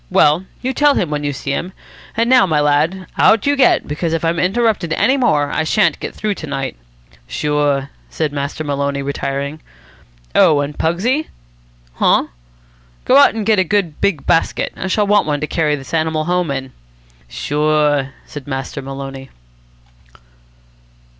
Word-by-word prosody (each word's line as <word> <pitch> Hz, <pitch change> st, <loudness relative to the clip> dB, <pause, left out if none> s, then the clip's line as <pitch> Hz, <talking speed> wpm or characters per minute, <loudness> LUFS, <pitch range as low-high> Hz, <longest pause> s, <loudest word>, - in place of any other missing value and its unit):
Well, 155 Hz, +6 st, +3 dB, 0.2 s
you 260 Hz, +1 st, -1 dB
tell 290 Hz, +1 st, +3 dB
him 165 Hz, -, -1 dB
when 150 Hz, 0 st, -2 dB
you 145 Hz, -, -1 dB
see 140 Hz, +1 st, -5 dB
him. 175 Hz, +6 st, -3 dB, 0.4 s
And 230 Hz, +1 st, +2 dB
now, 250 Hz, -5 st, +5 dB
my 155 Hz, -3 st, +1 dB
lad, 150 Hz, +6 st, +1 dB
out 220 Hz, -, +4 dB
you 285 Hz, 0 st, +3 dB
get, 265 Hz, -3 st, +3 dB
because 160 Hz, +3 st, -2 dB
if 165 Hz, 0 st, -1 dB
I'm 165 Hz, +1 st, 0 dB
interrupted 195 Hz, -3 st, +1 dB
any 265 Hz, -, +2 dB
more 155 Hz, -, +1 dB
I 160 Hz, -, 0 dB
shan't 200 Hz, +6 st, +2 dB
get -, -, -6 dB
through 215 Hz, -1 st, -1 dB
to 160 Hz, -, -6 dB
night." 135 Hz, -, -3 dB, 0.5 s
"Sure," 145 Hz, -2 st, 0 dB, 0.2 s
said 155 Hz, -2 st, -2 dB
Master 140 Hz, +2 st, -3 dB
Maloney, 140 Hz, -1 st, -2 dB
retiring. 140 Hz, +2 st, -3 dB, 0.7 s
"Oh, 150 Hz, -2 st, +5 dB
and 145 Hz, +1 st, -4 dB
Pugsy.. 235 Hz, -, 0 dB, 0.4 s
." -, -, -33 dB
"Huh?" -, -, +3 dB, 0.8 s
"Go 260 Hz, -, +5 dB
out 280 Hz, -5 st, +6 dB
and 220 Hz, -2 st, -3 dB
get 215 Hz, -2 st, +3 dB
a -, -, +4 dB
good 180 Hz, -4 st, -1 dB
big 175 Hz, -8 st, 0 dB
basket. 165 Hz, -, +1 dB
I 190 Hz, -, -4 dB
shall 205 Hz, +2 st, +1 dB
want 205 Hz, -4 st, +3 dB
one 145 Hz, -1 st, 0 dB
to 155 Hz, -, -2 dB
carry 150 Hz, -1 st, 0 dB
this 135 Hz, 0 st, -10 dB
animal 160 Hz, -1 st, 0 dB
home 180 Hz, -1 st, 0 dB
in." 135 Hz, -1 st, -4 dB, 0.6 s
"Sure," 150 Hz, -, 0 dB, 0.2 s
said 145 Hz, -2 st, -9 dB
Master 135 Hz, +1 st, -4 dB
Maloney. 135 Hz, 0 st, -7 dB
155 Hz, 165 wpm, -17 LUFS, 140-190 Hz, 0.8 s, out